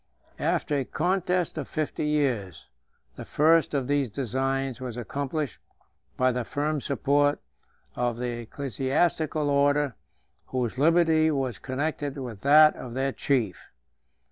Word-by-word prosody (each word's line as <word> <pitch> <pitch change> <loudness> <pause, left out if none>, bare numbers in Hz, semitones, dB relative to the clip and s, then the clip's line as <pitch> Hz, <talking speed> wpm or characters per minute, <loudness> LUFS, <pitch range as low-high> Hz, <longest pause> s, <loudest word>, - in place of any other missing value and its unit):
After 145 -1 0
a - - -1
contest 180 +2 -1
of 140 - -5
fifty 155 0 -2
years, 120 - -1 0.5
the - - -6
first 160 0 +3
of 135 -2 0
these 140 -3 +1
designs 135 +2 -2
was 125 -2 -5
accomplished 140 +2 -3 0.6
by 130 0 +3
the 125 0 -2
firm 150 +4 -2
support 145 +1 +1 0.6
of 120 -1 -1
the 120 -1 -3
ecclesiastical 140 - -1
order, 145 -1 +2 0.5
whose 125 -1 -2
liberty 160 0 +4
was 135 -5 -2
connected 145 +1 -3
with 120 -7 -7
that 150 +2 +7
of 120 -1 -8
their 135 +1 0
chief. 120 -10 -1
140 Hz, 125 wpm, -26 LUFS, 125-150 Hz, 0.6 s, that